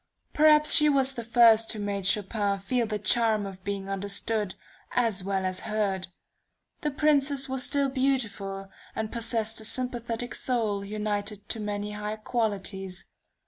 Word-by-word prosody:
Perhaps 300 0 +6
she 300 -2 +6
was 270 -2 +4
the 235 -3 -5
first 225 -1 +5
who 220 - -5
made 200 -2 -2
Chopin 205 0 +1
feel 230 +4 -1
the 215 -1 -2
charm 215 +1 +2
of 190 -1 -9
being 200 -1 -4
understood, 200 +1 -2 0.4
as 225 -6 0
well 190 0 -1
as 185 0 -2
heard. 200 -3 -1 0.7
The 300 - -1
Princess 280 -1 +2
was 260 -1 -2
still 280 -1 +2
beautiful, 225 -8 -1 0.2
and 220 -1 -3
possessed 225 -2 -1
a - - -9
sympathetic 240 0 -1
soul 220 -6 -1
united 205 0 -4
to 225 - -2
many 210 0 -3
high 210 +1 -4
qualities. 200 -4 -3
215 Hz, 145 wpm, -27 LUFS, 200-245 Hz, 0.7 s, Perhaps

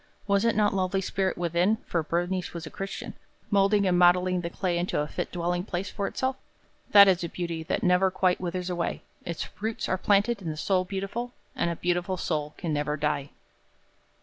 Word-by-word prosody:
Was 200 0 +2
it 230 - +3
not 210 -1 +3
lovely 190 0 0
spirit 190 0 -1
within, 175 +5 +2
for 170 - 0
Bernice 175 +3 -2
was 165 -1 -5
a - - -8
Christian, 195 0 -6 0.4
molding 200 0 +4
and 180 -1 +3
modeling 180 0 +4
the 170 - -3
clay 175 -1 -1
into 175 -2 -1
a 150 - 0
fit - - -4
dwelling 175 0 -1
place 185 0 -4
for 200 - -2
itself? 260 0 -2 0.5
That 200 -1 +9
is 185 -2 +3
a 170 - -3
beauty 170 -2 -4
that 160 - -2
never 180 +1 +4
quite 185 -1 +1
withers 180 0 -3
away. 175 -1 -2 0.2
Its 170 -1 -4
roots 220 +1 -2
are 185 - 0
planted 205 +3 +2
in 170 - -4
the 155 - -4
soul 185 +2 +1
beautiful, 200 +6 -4 0.2
and - - 0
a 170 - -2
beautiful 175 +2 -1
soul 150 -3 -2
can 165 -4 -2
never 150 0 -1
die. 145 -2 -1
180 Hz, 200 wpm, -27 LUFS, 170-195 Hz, 0.5 s, That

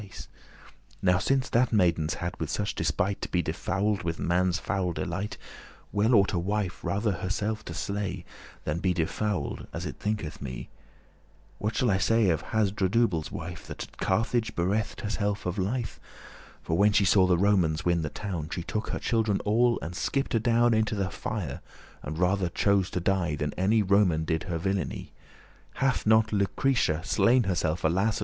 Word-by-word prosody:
*same 100 - -11 0.9
Now 90 -1 +4
since 130 +5 +1
that 120 +1 +3
maidens 85 -7 +2
hadde 85 -3 -4
such 100 +4 -1
despite 100 0 -1
To - - -4
be 90 -1 +1
defouled 95 +5 -1
with 85 -2 -3
man's 90 0 +1
foul 95 -2 -1
delight, 95 +4 -3 0.5
Well 110 +4 +3
ought 100 0 +4
a 90 - +1
wife 100 0 -2
rather 100 +5 0
herself 100 +4 -2
to 85 - -6
sle,* - - -8 0.2
*slay 100 -2 -3 0.4
Than 75 +2 -2
be 90 0 +1
defouled, 90 0 -2
as - - -5
it - - -5
thinketh 105 -8 -3
me. 65 -2 -6 0.9
What 105 +1 -2
shall 125 -4 +2
I 95 - +2
say 115 -2 +3
of 80 - -2
Hasdrubale's 100 -4 +1
wife, 85 -1 -7
That - - -6
at - - -14
Carthage 115 +3 0
bereft 100 +5 -1
herself 105 -1 -2
of 90 +3 -2
life? 115 +6 -2 0.6
For, 80 - -1
when 100 +3 +4
she 100 - +4
saw 95 0 +5
the 90 -1 +3
Romans 90 -5 +2
win 85 -1 +2
the 75 - -2
town, 85 -6 -5
She 85 - -4
took 110 +5 -3
her - - -2
children 110 -4 +1
all, 120 +3 +3
and 80 - -5
skipt 135 +7 -1
adown 120 +1 +3
Into 110 0 +1
the 95 -2 -1
fire, 105 -10 -4 0.4
and 75 +3 -5
rather 90 +1 +1
chose 100 +1 +2
to - - -2
die, 85 -4 0
Than 75 -1 -3
any 105 +4 +2
Roman 95 -5 +3
did 80 -1 -1
her 85 - -1
villainy. 90 -8 -2 0.6
Hath 135 -4 0
not 110 0 +4
Lucretia 100 -4 +1
slain 120 +4 +3
herself, 85 -4 -1
alas! 95 +7 +2
95 Hz, 175 wpm, -28 LUFS, 85-105 Hz, 0.9 s, saw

